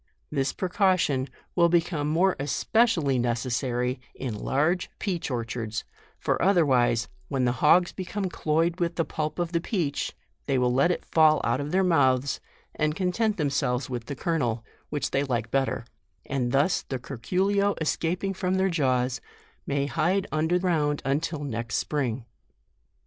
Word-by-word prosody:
This 140 Hz, -2 st, 0 dB
precaution 185 Hz, -8 st, +1 dB, 0.3 s
will 170 Hz, -1 st, +5 dB
be 170 Hz, -1 st, +3 dB
more 165 Hz, +4 st, +2 dB
especially 150 Hz, -, +2 dB
necessary 125 Hz, +1 st, -1 dB, 0.2 s
in 125 Hz, -4 st, -4 dB
large 155 Hz, -, 0 dB
peach 180 Hz, -6 st, -2 dB
or 120 Hz, -3 st, -2 dB
chards, 115 Hz, -1 st, -4 dB, 0.3 s
for -, -, -1 dB
otherwise, 130 Hz, -, +3 dB, 0.2 s
when 130 Hz, -2 st, 0 dB
the 120 Hz, -, +3 dB
hogs 175 Hz, +4 st, +5 dB
become 190 Hz, +1 st, -3 dB
cloyed 165 Hz, +1 st, 0 dB
with 170 Hz, -1 st, 0 dB
the 165 Hz, -, 0 dB
pulp 155 Hz, -1 st, -3 dB
of 175 Hz, -1 st, -1 dB
the 170 Hz, -1 st, 0 dB
peach, 165 Hz, -8 st, -2 dB, 0.3 s
they 135 Hz, -2 st, +2 dB
will 125 Hz, -1 st, +2 dB
let 135 Hz, +7 st, +4 dB
it 180 Hz, -, -2 dB
fall 155 Hz, -1 st, +5 dB
out 120 Hz, +4 st, +1 dB
of 145 Hz, -, -4 dB
their 190 Hz, +1 st, +3 dB
mouths, 140 Hz, -6 st, +2 dB, 0.3 s
and 155 Hz, 0 st, 0 dB
content 205 Hz, +4 st, 0 dB
them 150 Hz, -4 st, 0 dB
selves 130 Hz, -2 st, -1 dB
with 120 Hz, -2 st, -4 dB
the 140 Hz, -, -5 dB
kernel, 125 Hz, -9 st, -1 dB, 0.2 s
which 150 Hz, -, -2 dB
they 140 Hz, -, +1 dB
like 120 Hz, -4 st, -2 dB
bet 135 Hz, -1 st, +2 dB
ter; 115 Hz, -, -4 dB, 0.4 s
and 125 Hz, -3 st, -1 dB
thus 140 Hz, +7 st, +2 dB
the 130 Hz, -, -4 dB
curculio 190 Hz, -, 0 dB
escaping 175 Hz, +4 st, -1 dB
from 185 Hz, 0 st, -1 dB
their 190 Hz, 0 st, +2 dB
jaws, 130 Hz, -5 st, +1 dB, 0.5 s
may 140 Hz, 0 st, 0 dB
hide 180 Hz, +7 st, +1 dB
under 160 Hz, +3 st, +2 dB
ground 155 Hz, -5 st, 0 dB
until 150 Hz, +2 st, -1 dB
next 115 Hz, -3 st, -3 dB
spring. 130 Hz, -5 st, -1 dB
150 Hz, 160 wpm, -26 LUFS, 130-175 Hz, 0.5 s, will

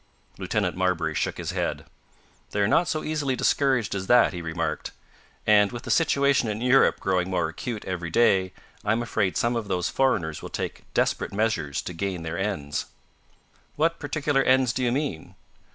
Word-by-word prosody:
Lieutenant 90 Hz, -, -1 dB
Marbury 90 Hz, -4 st, 0 dB
shook -, -, -1 dB
his -, -, -4 dB
head. -, -, -2 dB, 0.6 s
"They're 100 Hz, -1 st, +1 dB
not 170 Hz, -, +3 dB
so 155 Hz, -, -1 dB
easily 150 Hz, -4 st, -1 dB
discouraged 130 Hz, -5 st, +1 dB
as 95 Hz, -1 st, -4 dB
that," 120 Hz, -4 st, +5 dB
he 90 Hz, -, -5 dB
remarked. 80 Hz, -1 st, -3 dB, 0.6 s
"And, 105 Hz, -1 st, +5 dB
with 120 Hz, -1 st, -7 dB
the -, -, -3 dB
situation 140 Hz, -6 st, +3 dB
in 105 Hz, 0 st, -3 dB
Europe 125 Hz, +3 st, +4 dB
growing 95 Hz, -1 st, 0 dB
more 90 Hz, -3 st, 0 dB
acute 110 Hz, +6 st, -5 dB
every 90 Hz, -2 st, -4 dB
day, 95 Hz, -2 st, +3 dB, 0.3 s
I 105 Hz, -, +2 dB
am 120 Hz, +1 st, -1 dB
afraid 105 Hz, -5 st, 0 dB
some 120 Hz, +1 st, +1 dB
of 115 Hz, -3 st, -3 dB
those 90 Hz, -2 st, -1 dB
foreigners 85 Hz, -, 0 dB
will -, -, -7 dB
take -, -, -6 dB
desperate -, -, +1 dB
measures 100 Hz, -9 st, -1 dB
to 90 Hz, -, -6 dB
gain 90 Hz, -1 st, -3 dB
their 80 Hz, +2 st, -4 dB
ends." 75 Hz, -8 st, -2 dB, 0.9 s
"What 165 Hz, +2 st, +1 dB
particular 145 Hz, -1 st, 0 dB
ends 130 Hz, -2 st, +3 dB
do 130 Hz, -, -2 dB
you 120 Hz, -, +2 dB
mean?" 130 Hz, -, -3 dB
105 Hz, 175 wpm, -25 LUFS, 90-130 Hz, 0.9 s, that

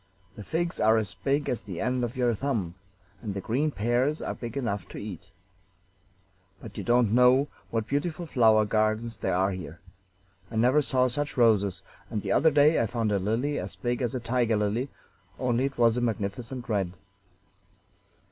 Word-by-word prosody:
The 105 Hz, -, -8 dB
figs 170 Hz, -, -2 dB
are 110 Hz, +1 st, +4 dB
as 105 Hz, -5 st, -1 dB
big 135 Hz, -, -1 dB
as 125 Hz, -, -1 dB
the 95 Hz, -3 st, -7 dB
end 125 Hz, +1 st, 0 dB
of 120 Hz, +2 st, -3 dB
your 120 Hz, -2 st, +2 dB
thumb, 110 Hz, -8 st, -2 dB, 0.5 s
and 100 Hz, -3 st, -5 dB
the -, -, -2 dB
green 130 Hz, +10 st, 0 dB
pears 125 Hz, +5 st, 0 dB
are -, -, -3 dB
big 120 Hz, +1 st, -6 dB
enough 105 Hz, -7 st, -2 dB
to -, -, -9 dB
eat. 90 Hz, -4 st, -7 dB, 1.3 s
But 110 Hz, 0 st, -11 dB
you -, -, -5 dB
don't 120 Hz, -3 st, +3 dB
know 125 Hz, +3 st, +5 dB, 0.2 s
what 115 Hz, -1 st, -1 dB
beautiful 155 Hz, +6 st, -2 dB
flower 110 Hz, -7 st, +4 dB
gardens 110 Hz, +1 st, 0 dB
there -, -, -1 dB
are 95 Hz, +2 st, +2 dB
here. 85 Hz, -4 st, -7 dB, 0.7 s
I 115 Hz, -, -8 dB
never 125 Hz, +7 st, +4 dB
saw 130 Hz, -2 st, +2 dB
such 145 Hz, +3 st, -3 dB
roses; 100 Hz, -6 st, +3 dB, 0.3 s
and 105 Hz, -3 st, -3 dB
the -, -, -2 dB
other 160 Hz, -, +5 dB
day 150 Hz, +1 st, +4 dB
I 115 Hz, -, +1 dB
found 115 Hz, -1 st, -1 dB
a 100 Hz, -, +2 dB
lily 115 Hz, +9 st, -1 dB
as -, -, -6 dB
big 120 Hz, 0 st, -2 dB
as 125 Hz, +1 st, -1 dB
a -, -, -1 dB
tiger 115 Hz, -1 st, +1 dB
lily, 105 Hz, +6 st, -1 dB, 0.5 s
only 125 Hz, 0 st, +1 dB
it 135 Hz, -, -4 dB
was 115 Hz, -1 st, +4 dB
a -, -, 0 dB
magnificent 115 Hz, +3 st, -3 dB
red." 100 Hz, -6 st, -1 dB
115 Hz, 185 wpm, -27 LUFS, 105-130 Hz, 1.3 s, know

